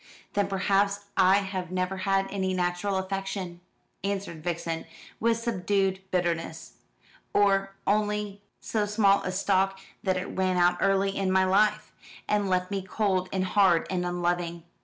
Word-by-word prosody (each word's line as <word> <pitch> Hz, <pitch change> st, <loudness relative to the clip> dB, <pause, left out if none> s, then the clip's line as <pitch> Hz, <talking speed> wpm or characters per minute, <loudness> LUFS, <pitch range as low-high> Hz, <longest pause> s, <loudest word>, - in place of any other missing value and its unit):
"Then 200 Hz, -1 st, +1 dB
perhaps 200 Hz, +1 st, +1 dB
I 190 Hz, +1 st, +5 dB
have 190 Hz, -3 st, -4 dB
never 185 Hz, +1 st, -2 dB
had 195 Hz, +1 st, +1 dB
any 190 Hz, -2 st, -1 dB
natural 180 Hz, +2 st, 0 dB
affection," 190 Hz, -2 st, -4 dB, 0.4 s
answered 195 Hz, -5 st, -3 dB
Vixen, 165 Hz, -1 st, -3 dB, 0.3 s
with 230 Hz, 0 st, +2 dB
subdued 195 Hz, -4 st, 0 dB
bitterness; 165 Hz, -2 st, -2 dB, 0.6 s
"or 195 Hz, -1 st, +3 dB
only 210 Hz, -1 st, 0 dB, 0.2 s
so 210 Hz, -2 st, -1 dB
small 205 Hz, -1 st, +4 dB
a 185 Hz, -, -3 dB
stock 195 Hz, 0 st, +1 dB, 0.2 s
that 185 Hz, -2 st, 0 dB
it 185 Hz, -, -3 dB
ran 185 Hz, -1 st, 0 dB
out 175 Hz, 0 st, +4 dB
early 195 Hz, 0 st, +2 dB
in 190 Hz, -1 st, 0 dB
my 190 Hz, 0 st, +4 dB
life, 205 Hz, +3 st, +2 dB, 0.4 s
and 205 Hz, -2 st, +1 dB
left 185 Hz, +1 st, 0 dB
me 195 Hz, -1 st, -1 dB
cold 190 Hz, -1 st, 0 dB
and 190 Hz, -1 st, 0 dB
hard 185 Hz, -4 st, +4 dB
and 180 Hz, -1 st, 0 dB
unloving. 175 Hz, -1 st, -1 dB
190 Hz, 145 wpm, -27 LUFS, 180-200 Hz, 0.6 s, I